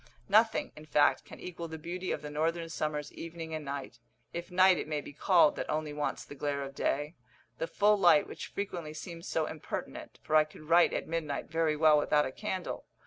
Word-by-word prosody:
Nothing, 220 Hz, +3 st, +3 dB
in 155 Hz, 0 st, -12 dB
fact, 145 Hz, -1 st, +3 dB
can -, -, -12 dB
equal 170 Hz, -1 st, -6 dB
the 160 Hz, 0 st, -7 dB
beauty 175 Hz, +4 st, -4 dB
of 150 Hz, -, -3 dB
the 150 Hz, -, -6 dB
northern 165 Hz, +2 st, -1 dB
summer's 150 Hz, -2 st, -3 dB
evening 165 Hz, -1 st, -7 dB
and 155 Hz, -1 st, -3 dB
night, 140 Hz, -1 st, -6 dB, 0.3 s
if 170 Hz, +1 st, -5 dB
night 185 Hz, 0 st, +5 dB
it -, -, -4 dB
may 155 Hz, -1 st, -1 dB
be 145 Hz, -, -9 dB
called 170 Hz, +1 st, +4 dB
that -, -, -4 dB
only 155 Hz, -1 st, -2 dB
wants 150 Hz, 0 st, -3 dB
the -, -, -10 dB
glare 140 Hz, 0 st, -2 dB
of 135 Hz, 0 st, -7 dB
day, 145 Hz, +3 st, -1 dB, 0.5 s
the 165 Hz, -, -1 dB
full 205 Hz, +4 st, +3 dB
light 200 Hz, 0 st, +6 dB
which -, -, -7 dB
frequently 175 Hz, -6 st, -5 dB
seems 170 Hz, +1 st, -8 dB
so 160 Hz, -, 0 dB
impertinent, 155 Hz, -1 st, -6 dB
for 155 Hz, -, 0 dB
I 155 Hz, -, +8 dB
could 155 Hz, 0 st, -14 dB
write 170 Hz, +3 st, +5 dB
at -, -, -3 dB
midnight 160 Hz, -3 st, -3 dB
very 160 Hz, -1 st, +2 dB
well 155 Hz, -1 st, +6 dB
without 150 Hz, 0 st, +3 dB
a 130 Hz, -, -4 dB
candle. 190 Hz, +2 st, -4 dB
155 Hz, 210 wpm, -31 LUFS, 150-170 Hz, 0.5 s, I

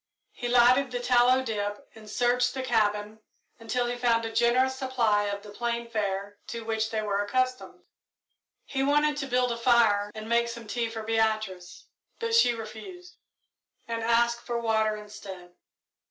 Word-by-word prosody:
He 245 Hz, -, -5 dB
lighted 250 Hz, +2 st, +4 dB
the 250 Hz, 0 st, -3 dB
tallow 250 Hz, +1 st, +4 dB
dip 205 Hz, -3 st, -4 dB
and 215 Hz, -1 st, -13 dB
searched 245 Hz, +3 st, +1 dB
the 260 Hz, -, -3 dB
cabin 215 Hz, -3 st, 0 dB, 0.4 s
until 230 Hz, +2 st, -1 dB
he 240 Hz, 0 st, -2 dB
found 230 Hz, -2 st, +2 dB
a 225 Hz, -, -5 dB
generous 255 Hz, +3 st, +3 dB
supply 240 Hz, -6 st, +1 dB
of 200 Hz, 0 st, -4 dB
the 210 Hz, -, -11 dB
plain 235 Hz, +2 st, -3 dB
fare 200 Hz, -1 st, -3 dB
to 230 Hz, -1 st, -6 dB
which 220 Hz, -1 st, -1 dB
they 220 Hz, -1 st, -2 dB
were 205 Hz, -1 st, 0 dB
accustomed. 255 Hz, +4 st, -2 dB, 0.8 s
He 270 Hz, -, -3 dB
wanted 295 Hz, +2 st, +2 dB
to 285 Hz, -2 st, -3 dB
build 250 Hz, -1 st, +1 dB
a 235 Hz, -, -3 dB
fire 230 Hz, -4 st, +3 dB
and 215 Hz, 0 st, -7 dB
make 235 Hz, +1 st, +2 dB
some 235 Hz, -1 st, -8 dB
tea 230 Hz, +2 st, -2 dB
for 225 Hz, -1 st, -6 dB
Beatrice, 215 Hz, -5 st, -1 dB, 0.3 s
but 460 Hz, 0 st, -3 dB
she 245 Hz, -, +5 dB
refused, 230 Hz, -, -10 dB, 0.7 s
and 230 Hz, 0 st, -3 dB
asked 235 Hz, +1 st, +2 dB
for 240 Hz, -1 st, -3 dB
water 220 Hz, -2 st, +1 dB
instead. 195 Hz, -4 st, -10 dB
230 Hz, 165 wpm, -27 LUFS, 215-245 Hz, 0.8 s, she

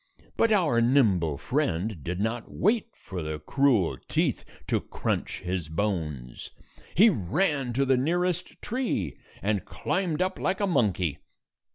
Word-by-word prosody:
But 230 Hz, -, +3 dB
our 165 Hz, -, +3 dB
nimble 100 Hz, -, +3 dB
friend 105 Hz, -, -1 dB
did 90 Hz, +1 st, -3 dB
not 110 Hz, +2 st, -2 dB
wait 220 Hz, +4 st, +2 dB
for 95 Hz, -3 st, -7 dB
the 75 Hz, -1 st, -3 dB
cruel 115 Hz, -, +2 dB
teeth -, -, 0 dB, 0.2 s
to -, -, 0 dB
crunch -, -, -3 dB
his 90 Hz, -3 st, -3 dB
bones. 80 Hz, -, -3 dB, 0.5 s
He 215 Hz, +6 st, +7 dB
ran 140 Hz, -, 0 dB
to 135 Hz, +3 st, +2 dB
the 135 Hz, -1 st, +3 dB
nearest 175 Hz, +6 st, 0 dB
tree, 225 Hz, -, -2 dB, 0.2 s
and 105 Hz, -1 st, +1 dB
climbed 180 Hz, -5 st, -2 dB
up 185 Hz, +1 st, 0 dB
like 190 Hz, -, 0 dB
a 205 Hz, -, +2 dB
monkey. 95 Hz, -, +1 dB
115 Hz, 140 wpm, -27 LUFS, -, 0.5 s, He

